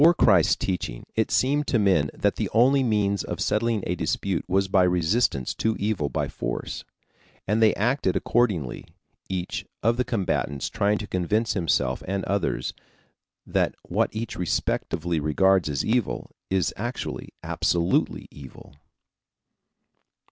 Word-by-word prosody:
Before 170 +3 +7
Christ's 95 - +5
teaching, 85 -10 -3
it 110 - +1
seemed 145 +3 +2
to 120 - +2
men 95 -9 +3
that - - +1
the - - -1
one 115 +2 +5
only 135 +1 +3
means 105 -5 +1
of - - -5
settling 110 -1 +1
a 90 - 0
dispute 90 +1 -1
was 95 +1 +2
by 95 -1 +3
resistance 90 - +1
to 110 0 -1
evil 100 -9 -1
by - - -1
force. - - -4 0.6
And 105 +3 +1
they 110 -1 +5
acted 125 +7 +1
accordingly, 95 - 0 0.4
each 90 -1 -3 0.2
of 115 +2 +3
the 125 - +2
combatants 90 - -1
trying 105 +1 +1
to 105 - -5
convince 105 +5 0
himself 70 - 0
and 95 +1 -2
others 100 +1 -1 0.7
that - - 0
what - - 0
each 110 +1 -4
respectively 85 -1 -1
regards 90 +3 +3
as 70 -2 -1
evil, 115 -1 -1 0.2
is 95 -5 +1
actually, 120 +4 -4
absolutely 85 +1 0
evil. 70 -3 -12
100 Hz, 140 wpm, -25 LUFS, 85-110 Hz, 0.7 s, Before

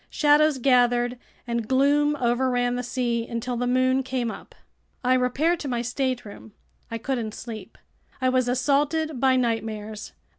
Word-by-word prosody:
Shadows 300 -1 +4
gathered 245 -1 +2 0.3
and 235 -2 -2
gloom 285 +3 +3
overran 245 -1 +1
the 245 - -2
sea 240 -2 -2
until 235 +1 -3
the 245 +1 -1
moon 255 +1 +2
came 255 -3 -2
up. - - -12 0.5
I 250 +1 +3
repaired 265 +7 +1
to 290 - -5
my 240 -2 -1
stateroom. 245 -4 -4 0.4
I 230 - -3
couldn't 230 -2 -3
sleep. 220 -5 -9 0.4
I 260 - +1
was 255 -1 +2
assaulted 290 +3 +1
by 260 0 +4
nightmares. 220 -3 -3
250 Hz, 145 wpm, -25 LUFS, 235-265 Hz, 0.5 s, Shadows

